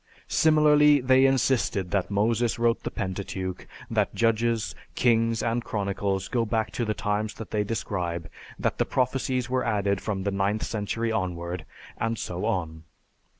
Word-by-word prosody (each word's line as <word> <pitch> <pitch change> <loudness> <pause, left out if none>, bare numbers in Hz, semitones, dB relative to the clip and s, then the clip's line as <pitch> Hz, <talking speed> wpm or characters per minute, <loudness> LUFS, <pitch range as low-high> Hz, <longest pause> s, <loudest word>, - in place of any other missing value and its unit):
Similarly, 150 -2 +5
they 130 +1 +5
insisted 125 -8 +1
that 100 -3 0
Moses 110 +3 +1
wrote 115 0 +2
the - - -3
Pentateuch, 95 -2 -4 0.2
that - - +1
Judges, 115 0 +1 0.2
Kings, 115 -2 +2
and 115 +1 0
Chronicles 100 -2 -2
go 120 -2 0
back 110 0 -1
to 120 - -2
the 110 -1 -1
times 105 0 -1
they 105 -1 -2
describe, 90 -6 -3 0.3
that - - -1
the - - +3
prophecies 130 -1 0
were 130 0 0
added 100 -4 0
from 100 -3 -3
the 100 - 0
ninth 100 +2 0
century 115 +2 -2
onward, 90 -4 -3 0.3
and 115 0 -1
so 90 +1 -4
on. 80 -8 -2
110 Hz, 150 wpm, -26 LUFS, 100-120 Hz, 0.3 s, Similarly